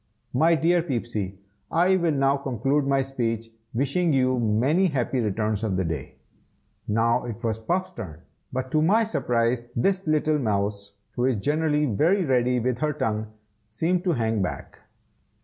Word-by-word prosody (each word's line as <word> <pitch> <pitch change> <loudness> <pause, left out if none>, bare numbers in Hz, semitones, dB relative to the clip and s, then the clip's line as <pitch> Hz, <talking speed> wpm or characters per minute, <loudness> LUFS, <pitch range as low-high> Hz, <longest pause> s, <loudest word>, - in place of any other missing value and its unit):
My 160 +6 +4
dear 170 +2 +3
Peepsy, 115 - -3 0.3
I 180 +3 +3
will 170 -3 +1
now 135 -1 +2
conclude 135 +1 0
my 135 -1 +2
speech, 115 -4 -3 0.2
wishing 140 +8 +1
you 130 -1 +2
many 125 - +2
happy 130 -4 -1
returns 110 -1 -1
of 105 -4 0
the 95 - +1
day." 75 -5 -5 0.7
Now 115 +2 +2
it 115 0 -7
was 110 -1 -1
Puff's 180 +11 -1
turn, 80 -2 -8 0.3
but 130 0 -3
to 155 - +3
my 205 +8 +4
surprise, 120 - 0
this 190 +8 0
little 155 0 +2
mouse, 100 -3 -2 0.2
who 125 - -1
is 130 -2 +2
generally 150 +6 +1
very 165 - +2
ready 125 -2 +2
with 125 +1 -1
her 150 -1 0
tongue, 110 -7 -2 0.4
seemed 170 +11 0
to 175 - +2
hang 110 -5 0
back. 90 - -5
130 Hz, 160 wpm, -25 LUFS, 110-155 Hz, 0.7 s, My